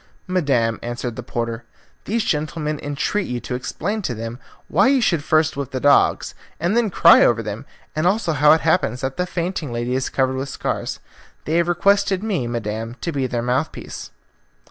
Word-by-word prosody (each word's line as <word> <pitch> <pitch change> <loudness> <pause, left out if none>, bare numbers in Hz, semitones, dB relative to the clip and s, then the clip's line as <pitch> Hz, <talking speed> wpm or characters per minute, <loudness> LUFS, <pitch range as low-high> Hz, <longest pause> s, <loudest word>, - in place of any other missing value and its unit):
"Madam," 135 -11 +1
answered 120 0 -4
the - - -5
porter, 115 0 -4 0.4
"these 225 +1 0
gentlemen 150 0 -2
entreat 145 +7 -1
you 125 0 -3
to 125 - -6
explain 190 - -3
to 125 -11 -3
them 115 +2 -6 0.3
why - - +3
you 270 0 +4
should 170 - +1
first 155 0 +2
whip 140 -2 -4
the 130 - -3
dogs 145 +2 +3 0.3
and 175 +6 0
then 235 -2 +2
cry 170 -2 +7
over 115 -1 +3
them, 110 +5 -6 0.3
and 155 +3 +1
also 190 -3 +1
how 150 +1 +5
it 160 - +5
happens 160 -7 +1
that 135 0 -2
the 180 0 -1
fainting 175 -5 -3
lady 120 +1 -2
is 130 0 -1
covered 130 -1 0
with 135 +1 -3
scars. - - -3 0.5
They 160 +2 +1
have 170 0 +2
requested 200 +3 +2
me, 185 - -1
Madam, 115 0 -4
to 170 - -2
be 135 -4 -1
their 120 -2 -2
mouthpiece." 130 +5 -3
145 Hz, 190 wpm, -21 LUFS, 120-175 Hz, 0.5 s, cry